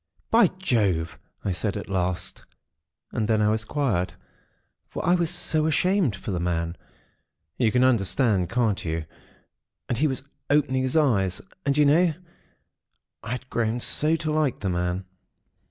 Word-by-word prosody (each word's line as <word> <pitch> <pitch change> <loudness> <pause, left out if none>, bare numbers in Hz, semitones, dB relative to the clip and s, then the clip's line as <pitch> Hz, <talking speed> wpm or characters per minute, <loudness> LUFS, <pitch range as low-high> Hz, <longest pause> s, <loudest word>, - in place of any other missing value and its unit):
"'By 225 -3 +6
Jove!' 95 - 0 0.3
I 100 - +1
said 100 +3 -1
at 105 - -6
last, 90 -2 -2 0.7
and 110 - -1
then 110 -1 +2
I 105 0 +3
was 110 0 0
quiet; 110 -8 -1 0.7
for - - -5
I 175 - +4
was 170 -2 +2
so 160 -3 0
ashamed 170 - +2
for 100 - -6
the 90 - -1
man. 85 -1 -1 0.8
You 115 -4 +3
can 125 +3 +3
understand, 110 -5 +2
can't 115 -3 0
you. 80 -1 -3 0.8
And 120 - -2
he 155 - +3
was 130 -2 -3 0.3
opening 140 -3 +2
his 130 +4 0
eyes. 100 - +2 0.3
And, 140 +1 +2
you 150 - +5
know, 165 +4 +4 1.1
I 110 - -8
had 125 +2 -4
grown 115 +1 0
so 150 +6 +3
to 160 -1 -2
like 150 -4 0
the 95 - -1
man. 90 +1 -1
115 Hz, 155 wpm, -25 LUFS, 95-150 Hz, 1.1 s, By